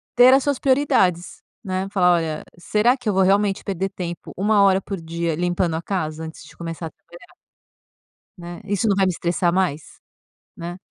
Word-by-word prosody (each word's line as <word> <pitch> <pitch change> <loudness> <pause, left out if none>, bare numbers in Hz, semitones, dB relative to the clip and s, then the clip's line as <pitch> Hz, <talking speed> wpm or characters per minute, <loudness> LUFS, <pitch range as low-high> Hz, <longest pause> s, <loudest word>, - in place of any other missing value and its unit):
ter 245 +1 +7
as 270 0 +4
suas 285 -3 0
prioridades, 190 - +1 0.2
né, 190 -1 -2
falar 180 -3 +4
olha, 160 -2 -2 0.2
será 220 +8 +2
que 245 - -10
eu - - +1
vou 190 0 +3
realmente 200 +1 +2
perder 195 0 -2
tempo 175 -3 -7
1h 200 -1 +3
por 195 -1 -5
dia 165 0 -2
limpando 175 -1 0
a 160 - -3
casa 160 -4 -3
antes 160 0 -9
de - - -16
começar 165 -1 -5
a - - -11
trabalhar? 175 - -17 1.0
Né, 175 +3 -9
isso 205 +2 0
não 200 - +3
vai 195 0 +3
me 185 - +2
estressar 170 0 0
mais? 180 -5 0 0.7
Né? 175 +1 -7
185 Hz, 180 wpm, -22 LUFS, 170-200 Hz, 1.0 s, ter